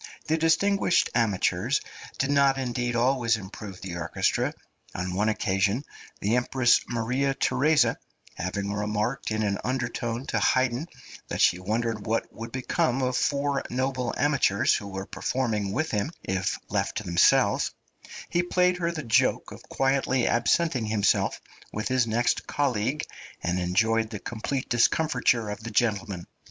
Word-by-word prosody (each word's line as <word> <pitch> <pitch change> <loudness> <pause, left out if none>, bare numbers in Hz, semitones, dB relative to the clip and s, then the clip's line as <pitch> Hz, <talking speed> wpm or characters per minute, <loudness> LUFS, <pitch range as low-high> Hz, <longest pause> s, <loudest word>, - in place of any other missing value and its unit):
The 160 - +1
distinguished 170 +4 +2
amateurs 115 -6 +1 0.4
did 135 +1 0
not 140 -1 +4
indeed 120 -2 -2
always 120 -2 +2
improve 100 -1 -9
the 90 -2 -5
orchestra. 85 - 0 0.4
On 90 +1 -3
one 105 +4 +1
occasion, 100 +4 0 0.4
the 105 +4 +1
Empress 125 -1 +3
Maria 125 +4 0
Theresa 140 -2 +2 0.3
having 100 +3 -3
remarked 105 +4 -2
in 110 0 -1
an 100 -1 0
undertone 120 -1 -2
to - - -1
Haydn 130 +4 +1 0.4
that - - -4
she 90 - +4
wondered 110 +2 -2
what 115 +1 -1
would 115 +1 -8
become 130 0 0
of 125 0 0
four 140 +1 0
noble 130 -1 -1
amateurs, 130 -6 +2
who 100 - -2
were 95 0 -5
performing 110 -6 -2
with 155 +9 -1
him, 105 +8 -1
if 95 0 -1
left - - -1
to - - -3
themselves, 85 0 +3 0.6
he 175 - +1
played 180 0 +2
her 170 -1 -1
the 155 -3 -5
joke 115 - +2
of - - -10
quietly 135 -2 +1
absenting 125 +1 +1
himself 105 -2 +1 0.3
with 105 +4 -3
his 130 -2 +2
next 115 +2 0
colleague, 135 +1 0 0.4
and 90 +1 0
enjoyed 110 +5 +1
the 110 - -5
complete 120 +6 -4
discomfiture 120 -3 +2
of 105 - -6
the 115 - -5
gentlemen. 100 -5 0
120 Hz, 145 wpm, -26 LUFS, 105-135 Hz, 0.6 s, not